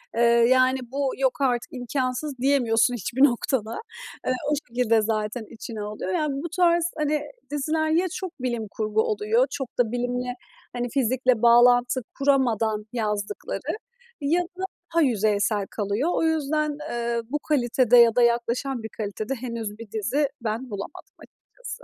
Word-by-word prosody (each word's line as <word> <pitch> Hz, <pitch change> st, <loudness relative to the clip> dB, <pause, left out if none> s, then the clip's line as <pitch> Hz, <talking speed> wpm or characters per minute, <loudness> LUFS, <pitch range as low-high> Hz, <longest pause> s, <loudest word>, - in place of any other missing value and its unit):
eee, 230 Hz, -, +1 dB, 0.3 s
yani, 255 Hz, 0 st, +4 dB
bu 275 Hz, -1 st, 0 dB
"Yok 265 Hz, +1 st, 0 dB
artık, 245 Hz, -3 st, 0 dB
imkânsız." 255 Hz, +2 st, -2 dB
diyemiyorsun 245 Hz, -3 st, +3 dB
hiçbir 245 Hz, +4 st, 0 dB
noktada. 240 Hz, -3 st, +1 dB, 0.5 s
Eee, 255 Hz, -, +3 dB, 0.2 s
o -, -, +4 dB
şekilde 235 Hz, -2 st, +2 dB
zaten 215 Hz, +1 st, -2 dB
içine 225 Hz, -1 st, -7 dB
alıyor. 210 Hz, -2 st, -4 dB
Yani, 300 Hz, +3 st, 0 dB
bu 340 Hz, -, -4 dB
tarz, 345 Hz, -1 st, +2 dB
hani, 300 Hz, -1 st, 0 dB, 0.3 s
diziler 315 Hz, +2 st, 0 dB
ya 335 Hz, +4 st, +3 dB
çok 375 Hz, -2 st, -4 dB
bilim 240 Hz, -3 st, -2 dB
kurgu 215 Hz, +1 st, 0 dB
oluyor 435 Hz, -, +1 dB
çok 270 Hz, -3 st, -6 dB
da 230 Hz, -3 st, +2 dB
bilimle, 245 Hz, 0 st, -2 dB, 0.4 s
hani, 245 Hz, 0 st, -2 dB
fizikle 255 Hz, -1 st, +1 dB
bağlantı 245 Hz, +1 st, +5 dB, 0.2 s
kuramadan 230 Hz, -6 st, +2 dB
yazdıkları 210 Hz, -, -3 dB, 0.4 s
ya 315 Hz, +5 st, +2 dB
da 365 Hz, +1 st, -9 dB, 0.3 s
daha 335 Hz, -, +4 dB
yüzeysel 210 Hz, -5 st, +1 dB
kalıyor. 210 Hz, -, -1 dB
O -, -, 0 dB
yüzden, 305 Hz, -1 st, 0 dB
eee, 235 Hz, 0 st, -1 dB
bu 295 Hz, +3 st, -1 dB
kalitede 250 Hz, -5 st, +3 dB
ya 235 Hz, -1 st, +7 dB
da 245 Hz, -, +4 dB
yaklaşan 235 Hz, +1 st, +1 dB
bir 220 Hz, -, -5 dB
kalitede 215 Hz, +4 st, -4 dB
henüz 230 Hz, -4 st, -5 dB
bir 230 Hz, -3 st, -10 dB
dizi 240 Hz, +7 st, 0 dB
ben 230 Hz, +3 st, -3 dB
bulamadım 200 Hz, -2 st, -8 dB
açıkçası. -, -, -11 dB
245 Hz, 150 wpm, -25 LUFS, 225-280 Hz, 0.5 s, ya